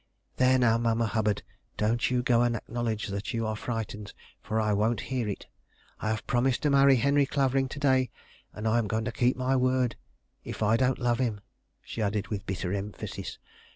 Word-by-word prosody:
"There, 130 0 +5
now, 115 -2 +3
Mamma 115 0 +1
Hubbard, 105 -1 0 0.3
don't 115 +3 +1
you 125 -1 +1
go 120 -2 +3
and 120 -1 +2
acknowledge 115 -2 -3
that 100 +3 -3
you 115 -1 -1
are 110 0 -1
frightened, 105 -2 -5 0.3
for 110 - -1
I 105 -1 +1
won't 110 +2 +1
hear 120 -5 0
it. 100 - -5 0.5
I 110 - -2
have 110 0 -2
promised 125 +2 +1
to 150 - +3
marry 140 -1 +6
Henry 140 +3 +3
Clavering 135 -1 +1
to - - -7
day, 130 -2 +3 0.4
and 105 +1 -4
I 115 +2 +3
am 110 - -1
going 110 +2 -1
to 125 - -2
keep 125 +3 +1
my 130 +1 +1
word 130 -2 +2 0.5
if - - -4
I 110 +2 +4
don't 130 +1 +2
love 120 -1 +1
him," 115 -5 0 0.4
she 115 - -5
added 105 0 -1
with 100 -2 -4
bitter 95 -1 -2
emphasis. 100 +1 -5
115 Hz, 195 wpm, -28 LUFS, 110-130 Hz, 0.5 s, marry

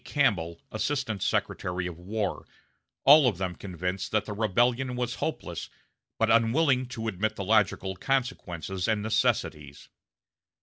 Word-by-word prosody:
Campbell, 85 - 0
Assistant 115 -3 -2
Secretary 90 0 -1
of 85 -2 -6
War 100 +1 -3 0.6
all 145 0 +8
of 105 -8 0
them 95 -1 -2
convinced 90 0 -4
that 110 -1 +1
the 105 - -5
rebellion 120 +5 +1
was 125 -1 -2
hopeless, - - -4 0.5
but 115 0 +2
unwilling 125 +3 +3
to 115 -3 -5
admit 110 +1 -1
the 100 - -4
logical 100 -2 +2
consequences 95 - -2
and 110 -2 +1
necessities. 75 -9 -1
110 Hz, 130 wpm, -28 LUFS, 90-125 Hz, 0.6 s, all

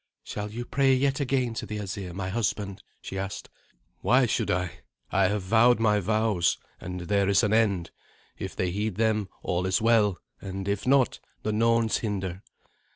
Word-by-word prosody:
"Shall 105 0 -5
you 120 +3 -5
pray 135 +1 +3
yet 135 +1 +1
again 130 -3 0
to - - -5
the 105 - -4
Asir, 100 -2 -5
my 95 +1 -4
husband?" 100 -2 -2 0.2
she 95 - -5
asked. 95 +1 -5 0.5
"Why 125 +1 +4
should 115 - 0
I? 90 -1 -1 0.3
I - - +3
have 100 0 -1
vowed 115 +5 +4
my 105 -2 +3
vows, 105 -3 +1 0.2
and 90 0 -6
there 100 +2 +1
is 100 +3 +4
an 105 0 +2
end. 100 -7 +2 0.5
If - - -5
they 90 -1 0
heed 105 +1 -2
them, 110 -3 +1
all 90 +1 0
is 95 - +2
well; 110 -4 +3 0.2
and 95 0 -5
if 100 +3 -1
not, 135 -2 +3 0.2
the 110 - 0
Norns 115 0 +3
hinder." 95 -4 -3
105 Hz, 175 wpm, -27 LUFS, 95-115 Hz, 0.5 s, Why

